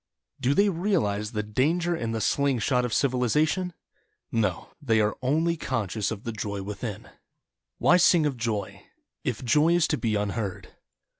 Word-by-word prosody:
Do 135 +1 +1
they 200 +1 +4
realize 160 - 0
the 105 -1 -2
danger 160 +11 +1
in 115 -7 -3
the 115 -1 -2
sling 140 +4 +1
shot 125 +2 +1
of 125 - -3
civilization? 145 - +1 0.6
No 105 -6 -1
— - - -46
they 115 -6 +2
are 105 0 +1
only 160 +6 +1
conscious 110 - -2
of 110 -2 -6
the 115 - -3
Joy 100 -2 -4
within. 105 +1 -5
DAY - - -17
DREAMS - - -26 0.6
Why 180 - +5
sing 175 -2 +5
of 145 -3 0
Joy 115 -4 -3 0.2
— - - -58
If 125 0 -3
Joy 150 +8 +4
is 170 -3 +3
to 150 - 0
be 110 -3 0
unheard. 105 -1 -3
125 Hz, 180 wpm, -26 LUFS, 105-155 Hz, 0.6 s, Why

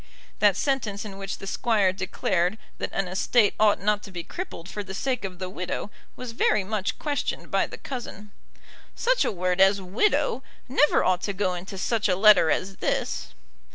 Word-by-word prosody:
That 205 -3 +4
sentence 225 -7 -1
in 195 -2 -8
which 195 0 -4
the - - -9
Squire 200 -1 +2
declared 185 0 0 0.2
that - - -3
an 195 -1 -1
estate 200 +4 +2
ought 215 -1 +4
not 210 +1 +1
to 200 - -10
be 175 -2 -5
crippled 345 - -7
for 205 +2 -5
the 190 -1 -7
sake 255 +2 -1
of 185 -2 -5
the 185 - -4
widow 185 +2 -4 0.2
was 250 -2 -6
very 215 -3 +2
much 200 0 -2
questioned 290 -2 -3
by - - +2
the - - -9
cousin. 220 -5 -7 0.6
"Such - - +2
a - - 0
word 180 -1 0
as 195 +1 +5
'widow' 260 - +1 0.3
never 285 +3 +3
ought 185 -1 +2
to 200 - -2
go 185 -1 0
into 185 +3 -7
such 215 +2 0
a 180 - +3
letter 210 -4 +6
as 190 +5 -1
this." - - -2
200 Hz, 190 wpm, -26 LUFS, 185-225 Hz, 0.6 s, letter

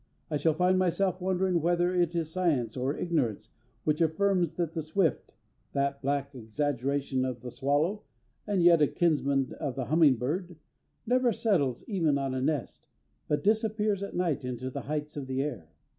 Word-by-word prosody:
I 150 - +1
shall 160 +1 +2
find 180 +2 +3
myself 185 +1 +1
wondering 185 -1 +1
whether 175 +2 +2
it 175 -2 +1
is 165 -2 -1
science 150 -11 0
or 130 +3 -1
ignorance 145 - -1 0.3
which 155 +1 +1
affirms 175 +1 +2
that 170 -2 -2
the 165 - -2
swift 160 +2 -1 0.4
(that 140 0 -1
black 140 0 -1
exaggeration 135 +2 -1
of 125 -2 -3
the 125 -1 -7
swallow 145 - 0 0.5
and 200 -4 +1
yet 170 -2 +6
a 150 - +6
kinsman 140 -6 +1
of 130 - -3
the 130 - -3
humming 155 -2 +5
bird) 170 - -3 0.5
never 250 +1 +3
settles 165 - 0
even 165 -9 +1
on 135 -1 -2
a 130 - -2
nest, 145 -2 -2 0.4
but 150 - 0
disappears 215 -1 +1
at 200 - -5
night 165 -6 0
into 125 +1 -4
the - - -4
heights 150 0 -4
of 135 -2 -5
the 130 +1 -1
air. 120 - -5
155 Hz, 175 wpm, -29 LUFS, 135-180 Hz, 0.5 s, yet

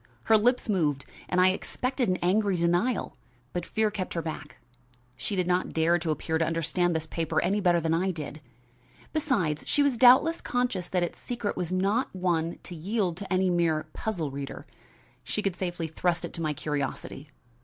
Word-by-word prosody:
Her 225 - +5
lips 245 +4 +3
moved 155 -9 +1 0.2
and 180 - +1
I 185 +1 +6
expected 250 +5 -1
an 185 - +2
angry 195 +2 +2
denial, 175 +8 +1 0.4
but 175 -1 -3
fear 220 -1 +1
kept 190 -4 -4
her 165 - 0
back. 160 - -6 0.6
She 165 - -3
did 180 -2 +1
not 180 +1 0
dare 165 +2 +3
to 160 0 -3
appear 160 +1 -1
to - - +3
understand 165 +1 0
this 160 0 -1
paper 165 0 -1
any 200 +4 +1
better 175 -2 +4
than 165 0 0
I 180 +4 +1
did. 155 -3 -5 0.7
Besides, 230 - 0
she 290 - +3
was 270 -5 +1
doubtless 260 +7 +6
conscious 245 -8 -1
that 180 -2 +1
its 175 - -4
secret 240 -4 -3
was 180 -1 -3
not 195 +6 0
one 170 -2 0
to 175 - -8
yield 185 +2 -1
to 195 0 -8
any 185 0 +3
mere 160 -3 +1
puzzle 170 -10 -3
reader. 140 0 -6 0.6
She 210 - -3
could 195 -3 0
safely 175 -2 -3
trust 170 +2 -1
it - - -8
to 170 - -5
my 155 -2 0
curiosity. 145 0 -4
180 Hz, 185 wpm, -28 LUFS, 165-205 Hz, 0.7 s, I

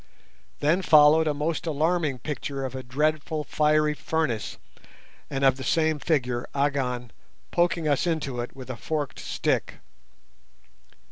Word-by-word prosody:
Then 160 +6 +3
followed 155 -1 +6
a 150 - +2
most 155 +3 -2
alarming 155 -2 +1
picture 140 -1 -4
of 130 - -5
a 130 - -5
dreadful 150 +4 -1
fiery 150 0 +2
furnace 150 -8 -2 0.7
and 135 0 -2
of 130 -1 +4
the 130 - -6
same 160 -1 +1
figure, 125 -7 0
Agon, 130 -4 -1 0.4
poking 170 -2 +1
us 145 +3 +1
into 145 -7 -2
it 120 - -7
with 130 -1 -7
a 125 - -7
forked 150 +3 -3
stick. - - -1
150 Hz, 135 wpm, -26 LUFS, 130-155 Hz, 0.7 s, followed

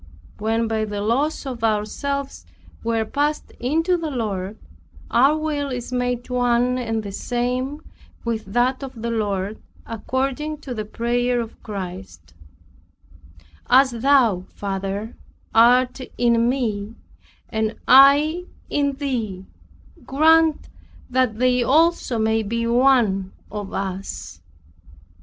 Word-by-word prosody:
When 225 +2 0
by 220 -1 0
the 205 -1 -4
loss 265 +10 0
of 250 -4 -6
ourselves 250 +6 -1 0.4
we 230 0 0
are 220 - 0
passed 295 +6 -1
into 325 +8 +1
the 330 -2 -3
Lord, 210 -6 -3 0.5
our 275 +5 +4
will 300 -2 -2
is 250 -1 -5
made 245 -1 -1
one 245 0 +1
and 225 -3 -2
the 200 - -6
same 250 +7 -2 0.4
with 225 -2 -2
that 245 +7 +1
of 260 -4 -8
the 235 +1 -3
Lord, 205 -2 -2 0.2
according 270 +6 -2
to 265 -4 -6
the 215 -2 -4
prayer 240 +3 0
of 230 -1 -6
Christ, 95 - -8 1.4
"As 260 +1 +6
thou 235 -6 +3
Father 195 +2 -4 0.4
art 250 +3 +4 0.2
in 235 -1 +3
me, 225 -4 -2 0.5
and 220 -1 -1
I 290 +6 +6 0.3
in 280 -1 +1
thee, 235 -9 -3 0.6
grant 320 +2 +4 0.4
that 250 -4 +1
they 250 +1 +3
also 305 -1 +2
may 220 0 +2
be 230 +2 -2
one 235 -6 +3 0.2
of 205 -1 -5
us." 190 - -5
240 Hz, 120 wpm, -22 LUFS, 215-270 Hz, 1.4 s, As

